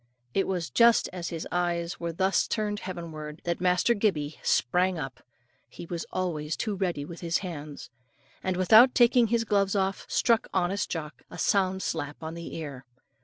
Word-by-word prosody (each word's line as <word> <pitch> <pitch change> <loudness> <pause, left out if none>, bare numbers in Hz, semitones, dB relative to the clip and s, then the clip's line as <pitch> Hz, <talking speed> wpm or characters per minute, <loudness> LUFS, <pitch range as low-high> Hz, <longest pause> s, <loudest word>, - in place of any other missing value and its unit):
It 195 - +1
was 175 -7 -2
just 235 - +5
as 175 -2 -4
his 165 -2 -5
eyes 175 -1 -1
were 170 0 -3
thus 190 +3 +1
turned 210 -1 -1
heavenward, 160 -4 -7
that 170 0 -2
Master 180 +5 +3
Gibbey 165 -9 -1
sprang 180 +7 +2
up 135 -4 -6 0.5
he - - -9
was 170 0 -5
always 160 -4 -2
too 215 -3 -2
ready 175 -7 -2
with 170 +2 -9
his 170 -1 +1
hands 150 -6 -7 0.5
and 185 -1 -1
without 220 +7 +7
taking 240 -1 +5
his 230 +1 +1
gloves 200 -2 +1
off, 195 0 -1
struck 230 -2 +2
honest 190 +2 0
Jock 155 -3 -5
a - - -10
sound 190 -1 +1
slap 150 -1 -4
on 160 +1 -5
the 170 0 -7
ear. 140 -5 -6
180 Hz, 170 wpm, -27 LUFS, 160-195 Hz, 0.5 s, without